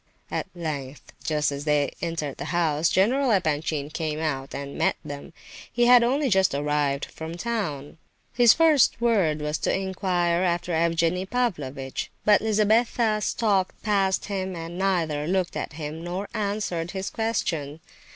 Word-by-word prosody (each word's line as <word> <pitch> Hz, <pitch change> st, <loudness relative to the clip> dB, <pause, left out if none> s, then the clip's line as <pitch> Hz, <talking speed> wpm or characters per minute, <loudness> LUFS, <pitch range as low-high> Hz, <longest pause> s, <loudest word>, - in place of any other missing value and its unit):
At -, -, -2 dB
length, 150 Hz, -5 st, -6 dB
just 150 Hz, -2 st, 0 dB
as 140 Hz, 0 st, -5 dB
they 145 Hz, -2 st, +1 dB
neared 165 Hz, -5 st, -3 dB
the -, -, -5 dB
house, 165 Hz, -2 st, +1 dB
General 255 Hz, +8 st, +2 dB
Epanchin 155 Hz, -6 st, 0 dB
came 155 Hz, -2 st, -3 dB
out 135 Hz, -4 st, -3 dB
and 140 Hz, 0 st, -6 dB
met -, -, +1 dB
them; 145 Hz, -1 st, -7 dB, 0.4 s
he 240 Hz, 0 st, +2 dB
had 245 Hz, 0 st, +8 dB
only 275 Hz, +4 st, +1 dB
just 190 Hz, -, +3 dB
arrived 145 Hz, -1 st, 0 dB
from 160 Hz, +1 st, -8 dB
town. 170 Hz, -10 st, -3 dB, 0.3 s
His 240 Hz, -2 st, +7 dB
first 315 Hz, -6 st, +4 dB
word 195 Hz, -11 st, +2 dB
was 150 Hz, +1 st, -1 dB
to -, -, 0 dB
inquire 180 Hz, -2 st, 0 dB
after 175 Hz, -1 st, 0 dB
Evgenie 170 Hz, +2 st, +1 dB
Pavlovitch. 145 Hz, -, -2 dB, 0.2 s
But 210 Hz, -1 st, +5 dB
Lizabetha 220 Hz, +1 st, +2 dB
stalked 200 Hz, -4 st, 0 dB
past 195 Hz, -3 st, +1 dB
him, 190 Hz, -2 st, -3 dB
and 165 Hz, +1 st, -6 dB
neither 165 Hz, -6 st, 0 dB
looked 185 Hz, 0 st, 0 dB
at -, -, -4 dB
him 155 Hz, +1 st, -6 dB
nor 180 Hz, +4 st, -4 dB
answered 200 Hz, -6 st, -2 dB
his 190 Hz, +1 st, -4 dB
question. 165 Hz, -10 st, -2 dB
175 Hz, 150 wpm, -25 LUFS, 150-205 Hz, 0.4 s, had